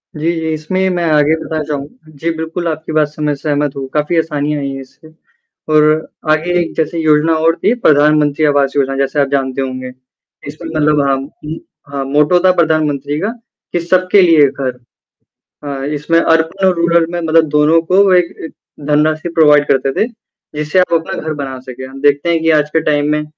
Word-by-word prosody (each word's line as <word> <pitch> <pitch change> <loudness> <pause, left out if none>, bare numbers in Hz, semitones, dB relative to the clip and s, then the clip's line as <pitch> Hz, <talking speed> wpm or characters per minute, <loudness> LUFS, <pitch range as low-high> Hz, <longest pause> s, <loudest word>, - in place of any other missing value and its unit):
जी, 160 +3 -1
जी। 160 0 -3
इसमें 155 +4 -3
ही 190 0 +1
मैं 175 -1 -1
आगे 150 +1 +3
बताना 155 -1 -3
चाहूँगा 145 +1 -7
जी, 165 +4 -2
बिल्कुल 165 +2 -4
आपकी 160 0 -4
बात 155 -1 +2
से 150 +1 -12
मैं 150 -1 0
सहमत 145 -1 -2
हूँ 135 -1 -5
काफ़ी 150 +3 0
आसानी 150 -2 -1
आई 140 -1 -3
है 135 0 -6
इससे 140 +4 -17 0.7
और 155 0 +5 0.5
आगे 160 +3 0
एक 170 - -3
जैसे 160 +1 -1
योजना 155 0 +3
और 165 0 +3
थी 225 - +3
प्रधानमंत्री 150 0 +3
आवास 140 -2 +2
योजना 135 -1 0
जैसे 135 +2 -1
आप 140 - +1
जानते 135 -1 -1
होंगे। 130 -1 -5 0.6
इसमें 155 +3 -8
मतलब 150 -2 +1
हम 135 0 -1 0.2
उ, 155 +2 -5 0.3
हाँ, 140 -1 -3
मोटो 150 +6 +2
था 185 - +6
प्रधानमंत्री 150 -4 0
का 200 - -1 0.5
कि 175 - +1
सबके 185 +3 +3
लिए 165 -5 +5
घर 130 -2 -5 0.9
हाँ, 135 -1 -4
इसमें 150 +3 0
अर्बन 165 +4 +1
और 185 - +2
रूरल 170 0 +2
में 175 - -3
मतलब 165 0 +2
दोनों 150 +2 +3
को 190 +3 +3
एक 180 -1 +4 0.2
एक - - -10 0.3
धनराशि 155 +2 +1
प्रोवाइड 150 -3 +4
करते 135 0 +1
थे। 220 - +2 0.5
जिससे 150 +4 0
आप 180 - +1
अपना 165 -1 -1
घर 155 0 -3
बना 135 -3 -6
सकें। 130 0 -9
हम 135 +1 -11
देखते 145 +3 +2
हैं 170 -1 +2
कि 165 - +1
आज 150 -1 +2
के 160 +1 0
टाइम 145 -1 +1
में 150 0 0
150 Hz, 200 wpm, -15 LUFS, 145-165 Hz, 0.9 s, था